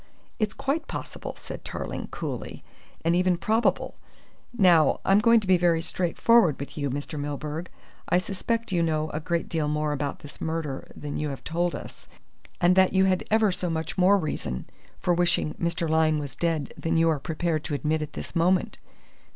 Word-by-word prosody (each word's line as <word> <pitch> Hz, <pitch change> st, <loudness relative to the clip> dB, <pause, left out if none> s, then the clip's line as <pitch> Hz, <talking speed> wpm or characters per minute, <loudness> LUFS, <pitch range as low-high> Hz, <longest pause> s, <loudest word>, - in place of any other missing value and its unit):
"It's 215 Hz, -3 st, 0 dB
quite 300 Hz, +4 st, -1 dB
possible," -, -, -6 dB
said -, -, -8 dB
Tarling -, -, -5 dB
coolly, -, -, -6 dB, 0.4 s
"and 170 Hz, +1 st, +3 dB
even 180 Hz, 0 st, +3 dB
probable. 220 Hz, +6 st, +1 dB, 0.6 s
Now, 175 Hz, -, +4 dB
I'm 195 Hz, +1 st, +5 dB
going 230 Hz, +2 st, +6 dB
to -, -, -7 dB
be 185 Hz, -1 st, +5 dB
very 170 Hz, -2 st, +2 dB
straightforward 180 Hz, -, +3 dB
with 140 Hz, -, -7 dB
you, 145 Hz, -2 st, -2 dB
Mr. 145 Hz, +3 st, -4 dB
Milburgh. 150 Hz, +3 st, -4 dB, 0.4 s
I 175 Hz, -, +4 dB
suspect 205 Hz, +5 st, -2 dB
you 175 Hz, -2 st, +2 dB
know 155 Hz, -1 st, 0 dB
a 155 Hz, -, -2 dB
great 170 Hz, +2 st, -1 dB
deal 160 Hz, -3 st, -1 dB
more 150 Hz, 0 st, 0 dB
about 145 Hz, -1 st, -3 dB
this 145 Hz, -, -11 dB
murder 160 Hz, -4 st, -3 dB
than 145 Hz, -1 st, -5 dB
you 150 Hz, 0 st, -2 dB
have 135 Hz, -, -7 dB
told 170 Hz, +2 st, -1 dB
us, -, -, -10 dB, 0.5 s
and 180 Hz, 0 st, +4 dB
that 190 Hz, 0 st, +4 dB
you 190 Hz, 0 st, +4 dB
had 185 Hz, -1 st, +1 dB
ever 215 Hz, -2 st, +4 dB
so 180 Hz, -1 st, -3 dB
much 160 Hz, -1 st, -3 dB
more 190 Hz, +2 st, +5 dB
reason 110 Hz, -, -3 dB, 0.3 s
for 180 Hz, -, +1 dB
wishing 175 Hz, -3 st, +1 dB
Mr. 170 Hz, -1 st, 0 dB
Lyne 160 Hz, -1 st, +3 dB
was 145 Hz, -2 st, -5 dB
dead 165 Hz, -5 st, -1 dB
than 165 Hz, 0 st, -1 dB
you 165 Hz, 0 st, +4 dB
are 160 Hz, -3 st, +2 dB
prepared 160 Hz, 0 st, -1 dB
to 150 Hz, -, -2 dB
admit 155 Hz, +2 st, 0 dB
at 150 Hz, 0 st, -5 dB
this -, -, -7 dB
moment. 180 Hz, +3 st, +2 dB
165 Hz, 185 wpm, -26 LUFS, 155-185 Hz, 0.6 s, going